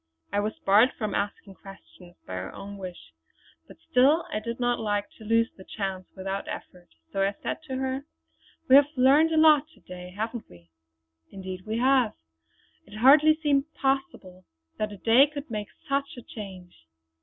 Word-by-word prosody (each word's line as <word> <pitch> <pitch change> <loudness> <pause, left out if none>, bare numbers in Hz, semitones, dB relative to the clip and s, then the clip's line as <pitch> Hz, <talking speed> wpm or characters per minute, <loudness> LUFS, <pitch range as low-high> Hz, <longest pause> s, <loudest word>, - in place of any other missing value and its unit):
I 205 - +2
was 210 +1 -2
barred 210 +6 +4
from 215 -4 -3
asking 200 -1 -3
questions 190 -2 -15
by 95 - -8
her 95 +1 -5
own 200 0 -8
wish; 180 - -9 0.5
but - - -15
still 280 +7 +3
I 215 - 0
did 235 +2 -6
not 245 -1 +1
like 205 -2 -2
to - - -11
lose 230 +1 +2
the 190 - -13
chance 190 -2 -5
without 195 +1 -4
an - - -2
effort, 180 -1 -21 0.2
so 195 - -1
I 195 +1 +1
said - - -3
to 265 -3 -5
her: 265 +1 -3 0.6
"We 260 - +7
have 285 0 +6
learned 280 +5 +5
a 320 - +1
lot 305 -2 +6
to - - -22
day, 180 0 -10
haven't 220 +5 -5
we?" 85 -1 -18 0.6
"Indeed 185 0 -8
we 220 +1 -2
have. 255 -2 +3 0.7
It 205 - -11
hardly 295 +6 +6
seems 280 -2 +2
possible 270 - -2 0.3
that 215 0 -1
a 205 - -9
day 235 +8 +5
could 290 -3 -8
make 210 -2 -3 0.2
such 275 -1 -2
a 245 - -9
change!" 185 - -11
215 Hz, 180 wpm, -26 LUFS, 195-265 Hz, 0.7 s, We